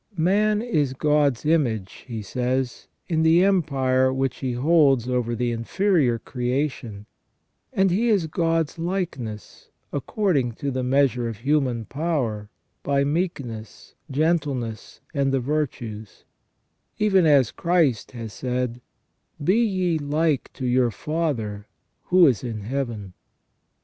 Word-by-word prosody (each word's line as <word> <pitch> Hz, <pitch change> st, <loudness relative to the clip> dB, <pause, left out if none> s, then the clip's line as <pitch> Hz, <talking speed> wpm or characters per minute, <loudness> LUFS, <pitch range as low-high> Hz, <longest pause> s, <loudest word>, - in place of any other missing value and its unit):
Man 210 Hz, +6 st, +2 dB
is 150 Hz, -, 0 dB
God's 145 Hz, -2 st, +1 dB
image, 120 Hz, -12 st, 0 dB
he 115 Hz, -4 st, -5 dB
says, 125 Hz, +4 st, -2 dB, 0.2 s
in 160 Hz, -2 st, +1 dB
the 165 Hz, +2 st, +5 dB
empire 135 Hz, -9 st, +2 dB
which 135 Hz, -1 st, -1 dB
he 130 Hz, -2 st, -3 dB
holds 135 Hz, -2 st, +3 dB
over 125 Hz, -2 st, 0 dB
the 120 Hz, 0 st, -1 dB
inferior 130 Hz, -, +1 dB
creation, 125 Hz, -4 st, -3 dB, 0.7 s
and 190 Hz, -6 st, +2 dB
he 225 Hz, +7 st, +2 dB
is 200 Hz, -7 st, +3 dB
God's 165 Hz, 0 st, -1 dB
likeness 165 Hz, -, -4 dB, 0.2 s
according 145 Hz, -, 0 dB
to 140 Hz, +5 st, -3 dB
the 130 Hz, 0 st, -2 dB
measure 125 Hz, -2 st, +2 dB
of 115 Hz, -, -6 dB
human 130 Hz, -2 st, 0 dB
power, 130 Hz, -10 st, -2 dB, 0.3 s
by 140 Hz, 0 st, +1 dB
meekness, 140 Hz, -, -4 dB, 0.2 s
gentleness, 140 Hz, -7 st, -1 dB
and 140 Hz, -2 st, +1 dB
the 135 Hz, -, +2 dB
virtues; 120 Hz, -6 st, -4 dB, 0.7 s
even 195 Hz, -5 st, +3 dB
as 140 Hz, -6 st, +4 dB
Christ 165 Hz, -10 st, +1 dB
has 115 Hz, -3 st, -7 dB
said: 125 Hz, -1 st, -3 dB, 0.3 s
" -, -, -16 dB
Be 200 Hz, +10 st, +3 dB
ye 185 Hz, -6 st, 0 dB
like 150 Hz, 0 st, 0 dB
to 130 Hz, -, -5 dB
your 125 Hz, 0 st, +3 dB
Father 115 Hz, -6 st, -3 dB, 0.4 s
who 180 Hz, -1 st, +6 dB
is 130 Hz, -7 st, +2 dB
in 115 Hz, -4 st, -4 dB
Heaven 115 Hz, -5 st, -4 dB
135 Hz, 125 wpm, -24 LUFS, 120-165 Hz, 0.7 s, who